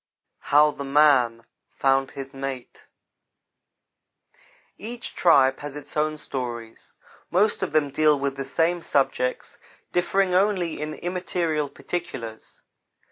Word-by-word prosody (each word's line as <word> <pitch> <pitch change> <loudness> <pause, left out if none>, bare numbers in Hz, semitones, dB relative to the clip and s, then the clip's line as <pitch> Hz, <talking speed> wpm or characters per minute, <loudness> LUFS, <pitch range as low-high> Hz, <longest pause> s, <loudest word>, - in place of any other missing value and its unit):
HOW 150 +1 +4
THE 140 - -7
MAN 135 -5 +3 0.3
FOUND 135 0 +1
HIS 135 -1 -8
MATE 135 -2 -7 1.9
EACH 235 +2 -7
tribe 135 -6 +4
has 145 -1 -7
its 150 -1 -10
own 155 0 0
stories. 120 -5 -6 0.4
Most 205 +5 +2
of - - -2
them 150 -2 +1
deal 150 +1 +3
with 140 0 -2
the 135 - -4
same 170 +4 +1
subjects, 135 -4 -1 0.3
differing 185 +1 +1
only 185 -4 +1
in 155 0 -4
immaterial 170 -4 -2
particulars. 115 -12 -7
150 Hz, 115 wpm, -24 LUFS, 135-170 Hz, 1.9 s, HOW